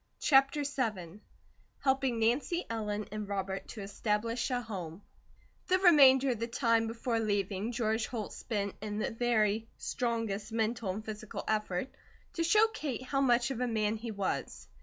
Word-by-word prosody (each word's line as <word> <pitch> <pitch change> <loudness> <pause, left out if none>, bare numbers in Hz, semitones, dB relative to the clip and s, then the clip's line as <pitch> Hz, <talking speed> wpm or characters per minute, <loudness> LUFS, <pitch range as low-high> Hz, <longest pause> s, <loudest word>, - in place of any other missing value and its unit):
CHAPTER 275 +1 +4
VII 215 - -3 0.6
HELPING 265 -3 +2
NANCY 255 +10 +1
ELLEN 210 -2 -3
AND 215 -1 -4
ROBERT 195 -1 -3
TO 215 - -8
ESTABLISH 215 +4 -1
A 250 -1 0
HOME 190 -6 -7 0.6
THE 370 - +4
remainder 275 -7 +7
of 235 - -3
the 230 - -2
time 230 -1 +2
before 230 +1 -1
leaving, 205 0 -1
George 220 -1 0
Holt 225 -4 -5
spent 200 -4 -3
in 210 -1 -4
the 215 - -1
very 225 -2 +1
strongest 225 -4 -2
mental 225 -1 -1
and 210 +4 -4
physical 215 -1 -6
effort 215 +1 -1 0.4
to 330 - -1
show 425 +6 +5
Kate 280 - -4
how 275 +1 0
much 245 -1 +3
of 250 -2 -3
a 250 - +1
man 215 -2 0
he 230 +2 -6
was. 200 -3 -3
225 Hz, 160 wpm, -31 LUFS, 210-250 Hz, 0.6 s, remainder